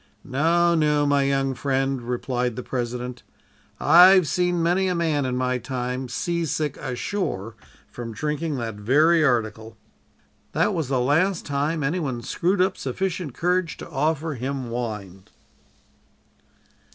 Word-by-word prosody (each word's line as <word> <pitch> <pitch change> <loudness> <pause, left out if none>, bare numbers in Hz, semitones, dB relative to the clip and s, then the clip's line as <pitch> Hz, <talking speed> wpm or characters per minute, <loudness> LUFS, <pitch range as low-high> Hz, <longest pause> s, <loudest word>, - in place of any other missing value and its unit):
"'No, 170 +5 +2
no, 150 -2 +2
my 145 -1 +3
young 135 -1 +1
friend,' 135 0 -1
replied 125 0 -2
the 125 - -5
President, 125 0 -4 0.6
'I've 180 0 +7
seen 175 +2 +1
many 180 +3 +2
a 180 - 0
man 155 -5 0
in 125 - -2
my 125 0 0
time 125 +1 -4
seasick 160 0 -2
ashore 125 - -3 0.3
from 120 -1 -7
drinking 150 +4 -2
that 115 -3 -3
very 150 +11 +3
article.' 110 -4 -1 0.8
"That - - +2
was 160 -5 -2
the 130 -1 0
last 160 +9 +1
time 145 +2 -1
any 155 +7 0
one 130 -7 -3
screwed 180 +8 0
up 185 0 +1
sufficient 170 +1 -3
courage 180 -1 0
to - - -9
offer 155 +2 0
him 130 -1 -4
wine." 105 -6 -5
140 Hz, 135 wpm, -24 LUFS, 125-165 Hz, 0.8 s, I've